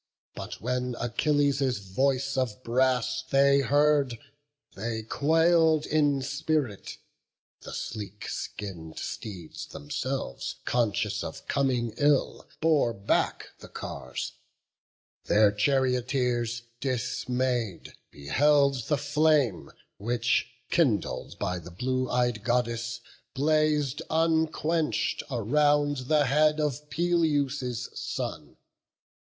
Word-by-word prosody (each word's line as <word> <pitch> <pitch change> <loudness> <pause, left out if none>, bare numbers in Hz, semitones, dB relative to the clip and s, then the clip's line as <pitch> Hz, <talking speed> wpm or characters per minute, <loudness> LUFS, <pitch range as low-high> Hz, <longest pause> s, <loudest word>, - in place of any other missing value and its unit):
But - - -7
when 125 +1 -2
Achilles' 140 +1 +1
voice 130 +8 0
of 130 -2 -2
brass 130 +1 +1
they 140 +1 +4
heard, 145 -2 +3 0.6
They 110 +2 -4
quail'd 160 +4 +3
in 145 -3 +2
spirit; 140 -5 -2 0.6
the - - -10
sleek 105 -2 -6
skin'd 85 -6 -6
steeds 90 -7 -6
themselves, 130 - -4
Conscious 115 -5 0
of - - -8
coming 125 -5 0
ill, 145 -1 +1
bore 155 -7 +3
back 100 +1 0
the - - -11
cars: 65 - -6 0.9
Their 105 0 +5
charioteers, 125 0 0 0.2
dismay'd, 125 -3 -2 0.2
beheld 140 - +2
the 150 - +2
flame 145 - +2 0.3
Which, 120 +2 +1 0.2
kindled 135 - 0
by 90 0 -2
the 85 +1 -10
blue 130 +8 -2
ey'd 120 -3 +1
Goddess, 120 0 -1 0.3
blaz'd 150 -1 +2
Unquench'd 160 0 +1
around 145 +2 +2
the 150 -1 +4
head 150 +3 +3
of 150 0 -2
Peleus' 145 -8 0
son. 120 - -5
130 Hz, 95 wpm, -28 LUFS, 120-145 Hz, 0.9 s, Their